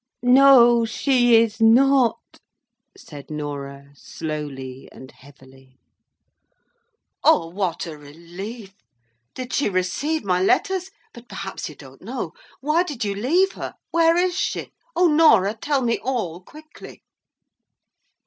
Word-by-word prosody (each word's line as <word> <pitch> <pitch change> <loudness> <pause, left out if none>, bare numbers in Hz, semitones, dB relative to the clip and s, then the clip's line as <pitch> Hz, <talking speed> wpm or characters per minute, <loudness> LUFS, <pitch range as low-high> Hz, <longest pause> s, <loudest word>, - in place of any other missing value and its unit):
"No, 245 -2 +6
she 245 +1 +2
is 225 0 +2
not!" 255 +2 +3 0.6
said 145 - -12
Norah, 140 -2 -7
slowly 140 -4 -7
and 130 - -13
heavily. 135 -1 -20 1.5
"O 315 - +4
what 185 -1 -3
a 155 -3 -9
relief! 180 +8 -10 0.6
Did 255 -1 -7
she 280 - +1
receive 200 - -2
my 180 -2 0
letters? 380 - +1 0.2
But 240 0 -15
perhaps 195 -2 -6
you 150 - -12
don't 135 -1 -15
know. 225 -5 -5 0.3
Why 305 +5 +1
did 295 -11 -4
you 200 - -2
leave 330 - +1
her? - - -8 0.2
Where 330 0 +3
is 360 0 +1
she? - - -3 0.2
O 355 +2 +3
Norah, 265 - +4
tell 270 +4 -2
me 230 -1 0
all 215 -10 -3
quickly!" 310 +10 -14
220 Hz, 120 wpm, -22 LUFS, -, 1.5 s, No